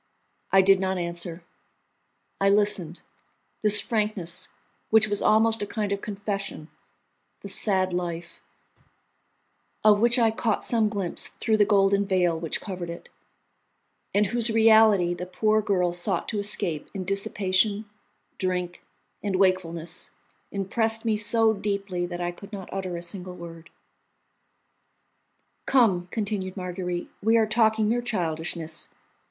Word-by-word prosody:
I 195 0 +6
did 195 0 +5
not 190 0 -1
answer; 170 0 -5 1.0
I 195 - +3
listened. 200 -5 0 0.6
This 210 -1 +8
frankness, 210 -5 -2 0.4
which 220 0 +5
was 205 -1 0
almost 220 +1 +3
a 205 - -3
kind 210 -2 -3
of 200 0 -2
confession, 200 -5 -5 0.7
the - - -8
sad 190 -2 +1
life, 175 -1 -5 1.4
of 210 -1 +5
which 235 +3 +4
I 230 -2 +3
caught 220 -1 -1
some 225 -3 +2
glimpse 200 -4 -2
through 220 -2 -1
the 205 - +5
golden 200 -1 +3
veil 180 -3 +2
which 165 -1 -3
covered 180 -4 -6
it, 170 - -9 1.0
and 205 +1 +2
whose 235 +3 +3
reality 220 -5 +5
the 180 +1 -6
poor 215 +4 +1
girl 180 -4 0
sought 175 0 -1
to 210 - -1
escape 180 -6 0
in 190 -2 -4
dissipation, 195 +2 0 0.5
drink, 180 -2 -2 0.4
and 200 -2 -2
wakefulness, 180 -3 0 0.4
impressed 225 +3 0
me 220 -1 +2
so 220 +1 +2
deeply 200 -3 -3
that 175 0 -6
I 175 0 -1
could 200 +4 -13
not 195 -3 -8
utter 185 -2 -4
a 170 - -5
single 180 +1 -7
word. 165 -1 -11 2.0
"Come," 200 -9 +3
continued 200 -3 -3
Marguerite, 180 -1 -4
"we 225 +3 +3
are 225 - +4
talking 220 0 +2
mere 240 +3 +1
childishness. 165 -7 -3
195 Hz, 135 wpm, -25 LUFS, 180-215 Hz, 2.0 s, This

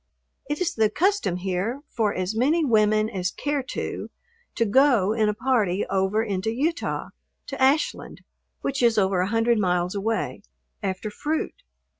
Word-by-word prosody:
It 295 - -1
is 345 -2 0
the 220 -1 +2
custom 370 - +1
here 190 +8 -2
for 220 -3 0
as 185 +2 -2
many 300 +8 +2
women 215 -3 +3
as 185 -4 -2
care 290 +7 -2
to - - -4 0.5
to 230 - +2
go 225 -3 +4
in 220 -2 +2
a - - +1
party 215 -6 +1
over 195 +3 +1
into 200 -1 -2
Utah 305 +8 -2 0.4
to 275 -1 -6
Ashland 275 +4 +1 0.4
(which 275 -1 -2
is 235 -2 +3
over 190 -2 +2
a 185 - 0
hundred 225 0 +2
miles 180 -2 +1
away) 220 +2 -2 0.4
after 195 +1 -3
fruit. 315 - -3
220 Hz, 155 wpm, -24 LUFS, 195-265 Hz, 0.5 s, go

